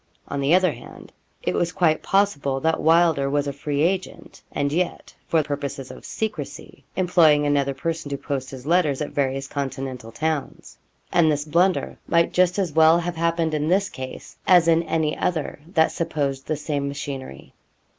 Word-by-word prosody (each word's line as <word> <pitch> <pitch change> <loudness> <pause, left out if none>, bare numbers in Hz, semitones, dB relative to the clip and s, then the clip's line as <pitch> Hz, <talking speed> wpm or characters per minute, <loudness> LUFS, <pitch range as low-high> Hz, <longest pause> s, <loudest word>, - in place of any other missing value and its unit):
On 140 - -3
the 140 +5 +4
other 185 -2 +3
hand, 120 -2 -12 0.3
it - - 0
was 170 -1 0
quite 160 -3 +2
possible 145 -9 +1
that 160 0 +1
Wylder 160 -3 +4
was 145 +1 0
a 140 - -3
free 140 +1 -2
agent, 185 +2 -3
and 140 0 -1
yet, 180 +2 -2
for 160 -2 +2
purposes 140 -2 -5
of - - -12
secrecy, 165 -9 -5
employing 170 -5 +4
another 140 -1 +1
person 165 +1 -3
to 140 - -3
post 135 -2 -4
his 130 -1 -9
letters 155 -4 +2
at 150 - -3
various 135 -1 -1
continental 135 -4 -5
towns; 150 +3 -4 0.3
and 160 -3 +4
this 145 0 -1
blunder 175 +4 +1
might 170 0 +2
just 180 0 +3
as 190 -5 0
well 160 +1 +6
have 175 0 -3
happened 165 -1 0
in 150 0 0
this 190 +3 +2
case, 130 -5 -8
as 175 -2 +6
in 165 0 +4
any 160 -2 -1
other 160 -5 -2
that 160 -4 +3
supposed 145 -5 -2
the 155 - -1
same 145 -1 -2
machinery. 135 - -7
155 Hz, 175 wpm, -23 LUFS, 140-170 Hz, 0.3 s, well